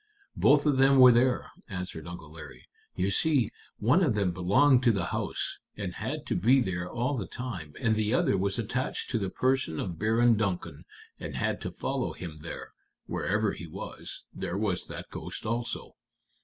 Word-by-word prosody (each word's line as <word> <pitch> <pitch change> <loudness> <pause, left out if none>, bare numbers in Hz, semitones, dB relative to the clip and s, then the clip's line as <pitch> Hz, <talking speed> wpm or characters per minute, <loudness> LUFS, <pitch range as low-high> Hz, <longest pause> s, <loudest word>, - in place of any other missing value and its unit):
"Both 145 +1 +5
of 145 -3 +3
them 135 +1 +6
were 125 -1 +10
there," 125 +1 +2 0.2
answered 90 -5 -5
Uncle 85 -3 -9
Larry. 80 0 -11 0.3
"You 95 +1 0
see, 135 -1 +2 0.3
one 130 - +4
of 130 -10 +2
them 100 -3 +1
belonged 100 +10 +4
to 125 -2 +5
the 100 -6 -1
house, - - -2 0.2
and - - -4
had - - -4
to - - -1
be 130 +5 +5
there 90 -6 -2
all 125 +7 -1
the 110 -7 -3
time, 95 - -6
and 110 -2 +2
the 110 0 0
other 120 - +3
was 95 +2 0
attached 125 +4 -2
to 115 - +1
the 95 -2 -2
person 130 -9 0
of 85 -5 -4
Baron 115 +2 +4
Duncan, 90 -7 -2 0.3
and - - -6
had - - -1
to - - -4
follow - - -2
him 80 -3 -7
there; 85 - -8 0.3
wherever 105 +1 0
he 85 - -7
was, 80 - -8
there 95 0 -3
was 100 -4 -1
that - - -8
ghost - - -7
also. 115 +2 -3
110 Hz, 185 wpm, -29 LUFS, 90-125 Hz, 0.3 s, were